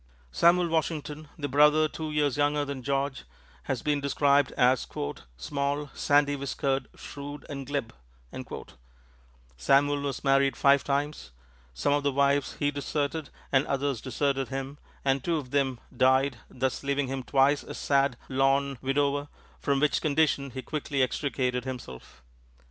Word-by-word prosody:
Samuel 175 - +4
Washington, 155 -2 -2
the 145 - -3
brother 150 +3 +5
two 155 0 -5
years 150 -3 +1
younger 145 0 +1
than 140 -2 -5
George, 135 +1 -1 0.4
has 130 -4 -2
been 145 -1 +1
described 140 0 +3
as 125 0 +3 0.5
"small, 140 - -2
sandy 145 0 +3
whiskered, 135 0 -2
shrewd 145 +1 -8
and 140 -3 -6
glib." 140 -5 -3 1.6
Samuel 140 - +3
was 140 -2 -4
married 135 0 +3
five 140 0 +4
times. 145 - -2 0.5
Some 140 - +1
of 145 - +2
the 140 0 +1
wives 140 +1 +1
he 145 0 +1
deserted 145 +1 -2 0.2
and 135 0 +3
others 140 -3 -1
deserted 135 0 -1
him, 135 +2 -5 0.3
and 135 -1 +1
two 170 0 +1
of 130 -4 -6
them 135 -4 +1 0.2
died, 130 0 +3
thus 130 0 -2
leaving 140 0 0
him 135 0 -3
twice 135 +3 +3
a - - -8
sad, 140 -3 +1
lorn 135 0 +1
widower, 140 +1 0 0.3
from 140 -1 +1
which 150 +1 +2
condition 145 -2 +1
he 130 0 -7
quickly 145 -3 -1
extricated 125 -2 -1
himself. 65 - -8
140 Hz, 145 wpm, -28 LUFS, 135-145 Hz, 1.6 s, brother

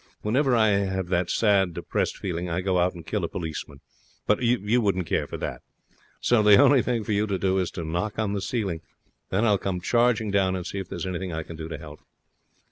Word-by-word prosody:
Whenever 130 +4 +2
I 110 -2 +4
have 95 -3 0
that 90 -1 +1
sad, 100 -6 +2
depressed - - -2
feeling, 90 -1 -3
I 85 +2 -1
go 90 -1 +1
out 90 +1 +1
and 85 -2 -10
kill 105 0 -2
a - - 0
policeman. 80 -6 -6 0.4
But 105 - +2
you 120 -1 +2
wouldn't 95 -4 0
care - - -1
for - - -6
that. - - -5 0.6
So 120 -3 +3
the 105 -1 +7
only 140 -1 +6
thing 120 -3 -1
for 105 - -4
you 105 +1 +1
to 100 -2 -1
do 95 +1 +1
is 90 - 0
to 85 - -6
knock 90 +7 -2
on 105 -2 -1
the 100 - -2
ceiling. 95 -7 -2 0.5
Then 105 +5 +1
I'll 105 -3 +3
come 95 -2 -2
charging 115 +1 +2
down 95 -2 +2
and 90 -2 -4
see 100 - -4
if 95 -2 -6
there's - - -4
anything 95 0 -3
I 80 0 -3
can 85 - -9
do 80 0 -6
to 80 - -6
help.' 75 -1 -11
95 Hz, 230 wpm, -25 LUFS, 90-110 Hz, 0.6 s, the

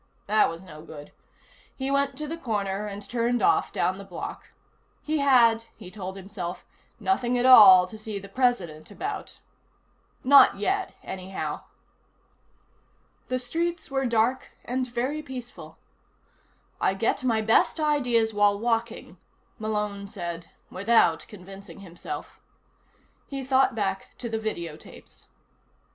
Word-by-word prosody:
That 215 +1 +3
was 165 +2 -8
no 155 -4 -12
good. 150 -2 -11 0.6
He 265 0 -3
went 280 -1 0
to 300 +1 -4
the 325 - -4
corner 210 -8 -2
and 200 0 -8
turned 240 0 0
off, - - +3
down 185 +1 -1
the - - -8
block. 185 -3 -8 0.5
He 310 0 -1
had, 235 -5 +4
he 185 -5 -12
told 190 -1 -7
himself, 190 -2 -7 0.3
nothing 250 -10 0
at 245 - +1
all 190 -8 +9
to 215 +4 -11
see 215 -1 -5
the 200 0 -8
President 195 -10 -1
about. 395 - -6 0.8
Not 275 -5 +7
yet, 380 - -1
anyhow. 190 0 -5 1.6
The 255 - -1
streets 330 +5 -3
were 270 -1 0
dark 235 +3 +1 0.2
and 255 +1 -2
very 255 +5 -2
peaceful. 255 -4 -9 1.0
I 190 - +1
get 225 +5 0
my 225 -3 +1
best 225 +8 +3
ideas 250 -7 +1
while 205 -1 +3
walking, 230 +1 -2 0.4
Malone 210 -2 -3
said 170 -4 -6 0.2
without 190 -5 +2
convincing 195 0 -12
himself. 175 -3 -8 0.9
He 275 -1 -5
thought 265 -1 +2
back 195 -3 -3
to 235 - -5
the 225 0 -2
video 170 -8 -4
tapes. - - -15
220 Hz, 130 wpm, -26 LUFS, 195-255 Hz, 1.6 s, all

